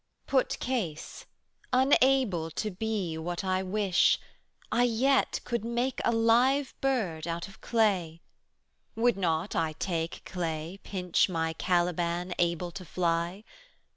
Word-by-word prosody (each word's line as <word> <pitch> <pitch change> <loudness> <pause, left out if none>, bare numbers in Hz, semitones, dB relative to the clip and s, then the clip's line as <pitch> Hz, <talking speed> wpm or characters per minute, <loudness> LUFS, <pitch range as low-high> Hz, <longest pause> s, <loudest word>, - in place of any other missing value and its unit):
Put 265 -2 +1
case, 205 -12 -4 0.4
unable 255 - +3
to 210 +6 -3
be 190 -5 -2
what 175 +3 -3
I 185 0 0
wish, 190 -1 +3 0.6
75 - - +2
I - - +5
yet 255 +4 +2
could 235 -3 -2
make 240 +3 -1
a - - +3
live 245 +5 +3
bird 195 -13 -1
out 170 0 -3
of 195 - -16
clay: 190 -8 +1 0.8
Would 235 +1 +3
not 175 0 -1
I 160 -2 0
take 165 0 -3
clay, 170 0 -4
pinch 180 -1 +1
my 165 -2 -1
Caliban 175 0 0
Able 175 0 0
to 190 +1 -8
fly? 175 +2 -1
185 Hz, 130 wpm, -29 LUFS, 170-230 Hz, 0.8 s, I